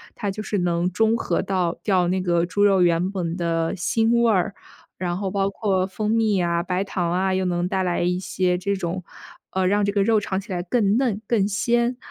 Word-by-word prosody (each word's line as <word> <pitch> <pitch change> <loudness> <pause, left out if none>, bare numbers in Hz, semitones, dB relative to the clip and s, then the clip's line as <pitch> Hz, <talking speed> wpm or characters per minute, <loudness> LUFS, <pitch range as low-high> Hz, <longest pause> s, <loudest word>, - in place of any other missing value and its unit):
它 205 - -3
就 215 +2 -5
是 205 -2 -2
能 175 0 0
中 225 +4 +2
和 - - -1
到 180 -3 -1
掉 185 -4 +2
那 185 +1 0
个 170 -2 +1
猪 205 +3 0
肉 195 -3 +4
原 175 +1 +2
本 175 -4 -3
的 165 -2 -1
腥 225 +5 +1
味 235 -1 +4
儿。 200 0 +1 0.5
然 175 -1 -2
后 195 -1 -3
包 195 0 0
括 195 -2 0
蜂 210 +3 -2
蜜 220 -3 +2
啊、 170 -1 +1
白 180 +1 -1
糖 180 -3 -2
啊， 190 +2 +1
又 190 0 0
能 175 0 0
带 190 0 -1
来 180 -2 0
一 180 +1 0
些 185 -1 0
这 200 +2 -1
种， 185 0 -4 0.5
呃， 190 0 -1
让 205 +2 +2
这 200 - +1
个 200 -1 +2
肉 220 +1 +3
尝 190 -2 -2
起 200 +1 -10
来 175 - -2
更 200 +2 +1
嫩、 240 -6 0
更 210 -5 +2
鲜。 235 +4 0
190 Hz, 240 characters per minute, -23 LUFS, 180-205 Hz, 0.5 s, 肉